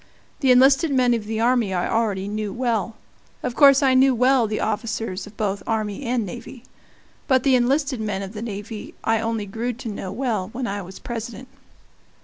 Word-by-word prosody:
The 270 - +1
enlisted 270 +5 +5
men 250 -2 +3
of 225 -3 -2
the 220 +1 -3
army 235 -4 +2
I 175 - 0
already 205 -4 0
knew 210 0 -3
well 235 -2 -1 0.5
of 250 - -2
course 275 +1 +6
I 265 -1 +4
knew 260 0 +5
well 250 -1 +3
the 215 0 -2
officers 215 -3 -3
of 210 - -15
both 200 -2 -1
army 215 0 -2
and 240 -2 0
navy. 230 +6 -9 0.6
But 260 -3 +3
the 270 - +3
enlisted 265 0 +1
men 200 -2 -2
of 195 +1 -8
the 210 - -6
navy 210 -1 -7
I 225 0 +2
only 225 -2 -2
grew 230 +5 -3
to 235 0 -7
know 195 -3 -5
well 215 -5 -2
when 255 +1 -3
I 205 -2 -3
was 190 +1 -10
President. 235 +1 -7
225 Hz, 190 wpm, -23 LUFS, 210-255 Hz, 0.6 s, course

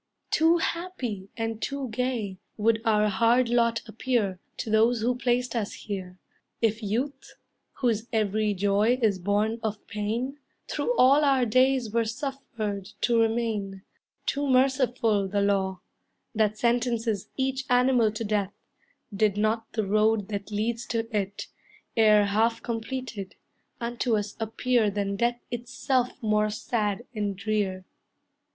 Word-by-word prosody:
Too 325 +2 +4
happy, 260 - -3
and 225 -1 -3
too 275 -1 -3
gay 220 -5 -2 0.2
Would 225 +1 +2
our 215 -1 +3
hard 230 +4 +3
lot 235 -1 +2
appear 220 -4 -1 0.2
To 225 - -4
those 225 +2 +3
who 245 +3 +2
placed 245 0 0
us 215 -3 -2
here, 185 -3 -6 0.4
if 225 0 +1
youth, 235 +8 -3 0.4
Whose 230 -3 0
every 215 -1 +1
joy 205 +5 +2
is 210 -6 +2
born 205 +4 0
of 215 -2 -4
pain, 230 +7 -3 0.3
Through - - -1
all 275 +4 +6
our 270 -3 +4
days 255 0 +3
were 230 +1 +2
suffered 225 -5 -4 0.2
to 235 -1 +3
remain; 220 -4 -1 0.4
Too 285 0 0
merciful 255 -5 +2
the 200 +1 0
law, 190 -2 0 0.5
That 215 -1 +1
sentences 235 -3 0
each 265 0 -1
animal 245 -3 +4
to 220 - -4
death, 205 -2 -1 0.6
Did 205 -1 +2
not 220 +2 0
the 220 -2 0
road 215 0 +2
that 200 -1 -4
leads 225 +3 -2
to 225 -1 -2
it, 200 -1 -2 0.5
E'er 215 -2 +6
half 220 +3 +1
completed, 235 -3 -5 0.4
unto 235 -1 0
us 205 0 -4
appear 225 0 +1
Than 200 0 -2
death 240 +3 0
itself 245 +1 0
more 215 0 +2
sad 210 0 -2
and 205 -3 -2
drear. 200 -3 -1
225 Hz, 135 wpm, -27 LUFS, 205-245 Hz, 0.6 s, all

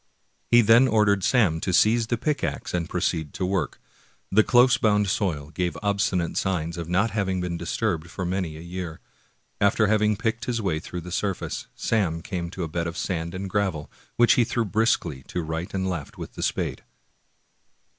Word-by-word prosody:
He 120 0 +7
then 115 +4 +6
or 110 -3 +3
dered 100 -1 +2
Sam 95 -7 +3
to 95 - -1
seize 110 +5 +4
the 120 - 0
pickax 145 +3 -2
and 85 -2 -1
proceed 80 -4 -1
to 95 - -1
work. 95 0 -1 0.5
The 110 - +6
close 125 +2 +5
bound 105 -2 +3
soil 80 -8 -1
gave 90 +1 -2
obstinate 100 -4 0
signs 85 -3 -1
of 85 -1 -6
not 100 +5 +2
having 95 -3 -1
been 90 -1 -2
disturbed 85 -1 -2
for 90 +2 -4
many 90 -3 -2
a - - -9
year. 85 -1 -6 0.6
After 100 +2 +3
having 105 0 +2
picked 115 +2 -2
his 120 -2 -1
way 90 -7 -1
through 90 +1 -6
the 90 +2 -9
surface, 95 +1 -3
Sam 85 -8 0
came 85 -2 -4
to 90 0 -5
a - - -2
bed 85 +1 -2
of 85 +1 -5
sand 85 -2 -3
and 95 +1 -4
gravel, 95 -6 -1 0.2
which 120 0 +5
he 120 - +4
threw 115 0 -1
briskly 105 - 0
to 90 - -3
right 80 +2 -4
and 95 -1 -1
left 85 -6 -5
with - - -8
the - - -7
spade. - - -1
95 Hz, 190 wpm, -25 LUFS, 85-110 Hz, 0.6 s, He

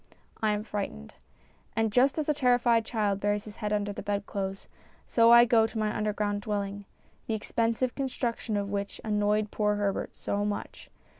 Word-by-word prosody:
I 215 -1 +2
am 210 0 -2
frightened. 195 - -5 0.6
And 225 -1 +1
just 260 +5 +4
as 310 - -1
a 300 - +3
terrified 245 -4 +3
child 210 -4 0
buries 205 0 0
its 215 0 -10
head 210 -2 -3
under 205 -1 0
the - - -6
bed 200 0 -2
clothes, 195 -1 -4 0.4
so 230 -1 +4
I 235 0 +9
go 225 -2 +4
to 225 - -8
my 215 -1 0
underground 210 -1 -1
dwell 205 -1 -1
ing, 200 +1 -7 0.4
the 225 - 0
expensive 230 +3 0
construction 240 -5 -2
of 200 0 -2
which 200 0 -3
annoyed 210 0 +1
poor 210 -1 +1
Herbert 205 -1 -2
so 205 0 -2
much. 205 0 -5
210 Hz, 180 wpm, -28 LUFS, 205-230 Hz, 0.6 s, I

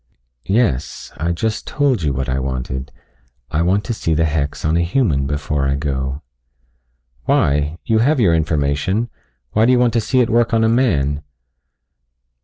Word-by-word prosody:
"Yes. 95 - 0
I 85 +1 -1
just 110 +6 -2
told 140 -8 +1
you 75 -2 0
what 65 0 -2
I 65 0 -1
wanted. 65 0 -4 0.6
I 75 +1 +1
want 95 +4 +2
to 120 - -3
see 80 -7 -1
the 80 +1 +2
hex 75 -2 -2
on 80 +1 +2
a 85 - +2
human 85 - +1
before 70 -1 -1
I 70 - +1
go." 70 -1 -3 1.0
"Why? 75 +3 +1
You 110 -2 +2
have 140 +5 +2
your 95 -8 +4
information. 80 +7 0 0.4
Why 110 +2 +3
do - - +5
you 125 - +4
want 120 -2 +2
to 115 - +2
see 130 +4 +1
it 120 - +2
work 115 0 +2
on 115 - +3
a - - +4
man?" 75 - +1
80 Hz, 175 wpm, -19 LUFS, 70-115 Hz, 1.0 s, do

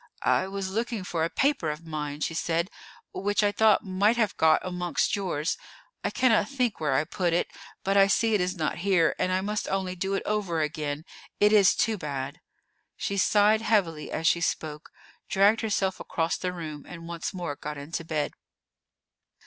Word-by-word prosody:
"I 185 - +3
was 195 -1 -4
looking 225 -1 -2
for 170 -3 -2
a 165 - +1
paper 270 - +1
of 150 +2 -5
mine," 150 -2 -4
she 165 - -1
said, 170 +3 -1 0.4
"which 205 +2 0
I 205 - +3
thought 215 -1 +4
might 200 +5 +2
have 220 -4 +1
got 160 -1 +4
amongst 180 +1 0
yours. 180 -5 -2 0.4
I - - +1
cannot 225 -5 +3
think 250 -6 -1
where 150 -3 0
I 140 - +3
put 175 +2 -1
it; 175 - 0 0.3
but 195 +1 +2
I 195 0 +7
see 225 +2 +2
it 205 - +3
is 180 +1 -1
not 160 0 -2
here, 180 -3 +3
and 185 - +1
I 185 0 +1
must 210 +2 -2
only 190 -1 -1
do 195 +2 -1
it - - -2
over 200 -6 -1
again. 150 0 -3 0.3
It 210 +1 +5
is 200 -3 +6
too 220 -3 +1
bad." 140 -2 -4 0.6
She 200 - -2
sighed 210 +2 +4
heavily 185 -9 +1
as 160 - -3
she 170 +1 +4
spoke, 155 -2 -3 0.4
dragged 200 +3 +4
herself 200 -4 0
across 165 0 -1
the 180 - -3
room, 155 -4 -7
and 165 -1 -9
once 170 -1 -4
more 175 -6 -4
got 150 +1 -6
into 150 +4 -5
bed. 155 -2 -2
185 Hz, 190 wpm, -27 LUFS, 160-205 Hz, 0.6 s, I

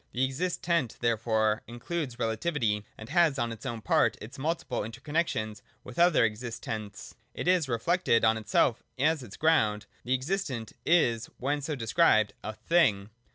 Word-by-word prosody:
The 130 +2 +2
existent 165 0 -1
therefore 110 -2 +1
includes 125 +2 -4
relativity, 115 -2 -1
and 110 - -9
has 170 -5 +3
on 120 -2 -1
its 115 +3 -7
own 115 -3 -4
part 105 - +2
its 125 +6 -10
multiple 160 +5 -2
interconnexions 115 -2 -2 0.2
with 125 - -8
other 175 -8 +5
existents: 110 -2 -6 0.2
it - - -4
is 180 -6 +3
reflected 120 0 +2
on 110 0 +4
itself 110 +2 +1 0.2
as 155 +3 +2
its 115 -6 -10
ground. 110 -10 +2 0.2
The 125 +2 +1
existent 130 - -3
is, 120 -9 +3
when 145 +3 -1
so 150 +2 -3
described, 115 -3 +3
a 110 - -4
Thing. 110 -13 +2
120 Hz, 150 wpm, -29 LUFS, 110-160 Hz, 0.2 s, other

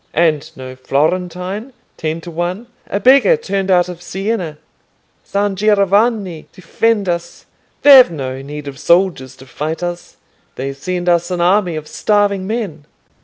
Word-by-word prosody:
"And 155 -2 +1
no 130 -1 -8
Florentine, 180 - -2 0.2
ten 160 +1 -3
to 170 - -9
one! 175 +7 -3 0.2
A 200 - -2
beggar 275 - +5
turned 195 - -3
out 180 -2 +4
of 175 -1 -8
Siena. 185 -2 -3 0.7
San 200 0 -1
Giovanni 200 -2 +1
defend 205 +3 -1
us! 170 -1 -4 0.4
They've 270 -6 +9
no 135 -5 -5
need 145 +1 -8
of 135 -1 -8
soldiers 170 -8 +1
to 130 - -15
fight 155 +6 -5
us. 175 0 -6 0.4
They 135 +1 -4
send 175 +6 -4
us 175 0 +2
an 180 -1 -2
army 180 0 +2
of 155 -1 -6
starving 200 -1 0
men." 195 -10 -4
180 Hz, 145 wpm, -17 LUFS, 155-200 Hz, 0.7 s, They've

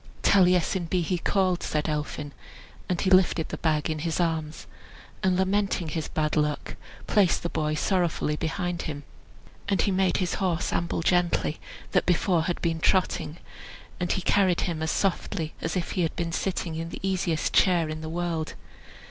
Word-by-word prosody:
"Taliesin 180 -1 +4
be 180 -1 +1
he 180 +1 -1
called," 185 -1 +1
said 150 -1 -1
Elphin. 150 -1 -3 0.6
And 180 -2 0
he 190 - +1
lifted 185 -3 +4
the - - -4
bag 155 -2 +1
in 155 -1 -2
his 160 +2 -2
arms, 160 -3 -1 0.6
and, 185 -2 +2
lamenting 190 -2 +1
his 160 0 -3
bad 155 -1 -1
luck, 150 -1 -1 0.3
placed 195 -4 +3
the 170 - -1
boy 155 -1 0
sorrowfully 170 -3 0
behind 175 +2 -2
him. 145 -2 -5 0.7
And 195 - +2
he 200 - +1
made 190 -1 +2
his 180 -2 -1
horse 180 -2 0
amble 170 0 -1
gently, 175 -3 +1 0.3
that - - +2
before 175 -1 +2
had 175 - -1
been 165 -1 0
trotting, 175 -2 +1 0.6
and 175 -1 -1
he 190 - -1
carried 190 -4 +3
him 165 -3 -2
as 160 - -1
softly 165 -4 -1
as 165 +3 -2
if 175 - -2
he 185 - 0
had 165 - -1
been 170 -1 -2
sitting 175 -1 -2
in 165 +1 -4
the - - -7
easiest 180 -4 0
chair 175 -4 +4
in 155 0 -5
the 160 - -5
world. 165 -1 -2
170 Hz, 175 wpm, -26 LUFS, 160-185 Hz, 0.7 s, Taliesin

